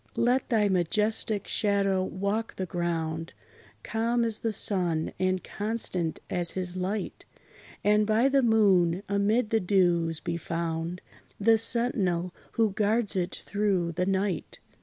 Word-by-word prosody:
Let 250 +2 +1
thy 215 -3 +3
majestic 210 +3 0
shadow 195 -2 +1
walk 200 +4 -3
the 190 - -3
ground, 165 -2 -3 0.5
Calm 235 +1 0
as 225 -2 -1
the 225 - -1
sun, 175 -6 0
and 185 0 0
constant 200 -6 -3
as 175 -1 0
his 180 -1 -3
light; 190 +3 -3 0.6
And 210 0 +3
by 220 +4 +3
the 275 0 +3
moon, 195 -6 +3
amid 210 +3 +1
the 225 - +3
dews, 175 -4 +2
be 170 - -3
found 165 +1 -3 0.4
The 225 +2 +4
sentinel, 200 -7 +2 0.2
who 225 -3 +2
guards 210 +2 +1
it 180 -1 -3
through 200 -4 0
the 180 +2 -2
night. 195 -1 -1
195 Hz, 135 wpm, -27 LUFS, 175-220 Hz, 0.6 s, The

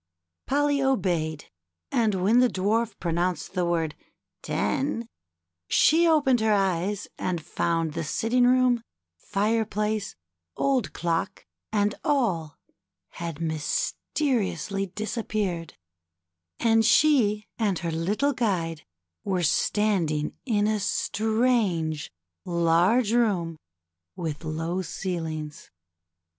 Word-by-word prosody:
Polly 285 0 +2
obeyed, 175 - 0 0.5
and 220 -3 +2
Avhen 195 +6 +3
the 250 - +6
Dwarf 210 +3 0
pronounced 175 0 -1
the 180 -2 0
word 165 -3 0 0.3
" - - -60
ten! 265 -5 -1 0.3
" 85 - -60 0.2
she 335 +2 +4
opened 285 -6 +4
her 220 0 +2
eyes 195 +1 0
and 180 -2 -1
found 165 0 -1
that 165 - -3
the - - -3
sitting 230 - +2
room, 250 -1 +3 0.3
fireplace, 210 - -1 0.4
old 265 -5 +1
clock, 165 -1 -2 0.3
and 205 -1 +1
all 185 - 0 0.5
had 170 -2 -6
mysteri 170 - -1
ously 195 +4 -3
disappeared, 200 - -3 0.8
and 225 -1 +4
she 225 -5 +4
and 205 -5 +1
her 165 - 0
little 205 - 0
guide 175 - -1 0.4
were 185 -3 -1
standing 165 -4 +1
in 210 -4 +2
a 215 0 +1
strange, 210 -7 0 0.3
large 175 +7 +2
room 195 -9 +1 0.6
with 160 -3 -4
low 165 +3 -2
ceilings. 160 -4 -5
200 Hz, 105 wpm, -26 LUFS, 165-230 Hz, 0.8 s, the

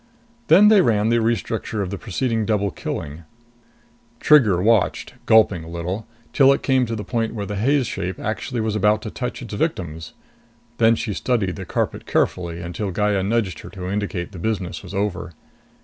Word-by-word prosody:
Then 210 +3 +7
they 215 -3 +6
ran 110 - +2
the 120 - +3
restructure 115 -1 -1
of 90 - -5
the 100 - -3
preceding 115 +2 -1
double 105 -2 0
killing. 75 -1 -5 1.0
Trigger 115 - +5
watched, 110 +1 +1
gulping 105 -6 +4
a 80 - -10
little, 90 +6 -4 0.3
till 135 -2 +6
it 140 - 0
came 130 -2 +2
to 115 - -3
the 105 - -5
point 115 -1 -2
where 100 -2 -3
the 105 - -5
haze 135 +5 +2
shape 95 -3 -4
actually 115 +3 -3
was 110 -1 -1
about 105 +1 +2
to 110 - -5
touch 125 0 -5
its 115 - -9
victims. 85 - -3 0.7
Then 115 0 +5
she 110 -2 -3
studied 100 -5 -1
the 95 - -7
carpet - - -3
carefully 85 -1 -1
until 85 +4 -4
Gaya 105 +1 0
nudged 100 -4 -1
her - - -10
to 90 -3 -7
indicate 100 -3 -3
the 95 - -9
business 95 -3 -3
was - - -9
over. 95 -4 -2
105 Hz, 180 wpm, -22 LUFS, 95-115 Hz, 1.0 s, Then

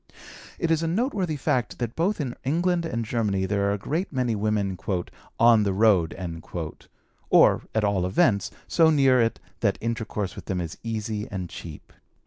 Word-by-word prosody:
It 165 -2 0
is 165 -1 +2
a 165 - -1
noteworthy 190 - 0
fact 125 -3 -1
that 120 -2 -3
both 185 +5 0
in 130 -5 -2
England 170 +4 +1
and 115 -6 -3
Germany 105 -5 0
there 100 +1 0
are - - +1
a - - -1
great 160 - -3
many 125 -5 0
women 105 -2 0 0.6
"on 115 -1 +6
the 100 -2 +1
road," 95 -5 +3 1.1
or, - - +6
at 110 - +2
all 100 -3 +1
events, 100 +2 +2 0.2
so 165 -1 +4
near 135 -5 +4
it 115 0 0 0.2
that 100 -4 +1
intercourse 110 -4 -3
with - - -9
them 95 -2 -2
is 85 -1 -5
easy 110 -2 -3
and 90 -4 -5
cheap. 85 -3 -10
115 Hz, 170 wpm, -25 LUFS, 100-145 Hz, 1.1 s, on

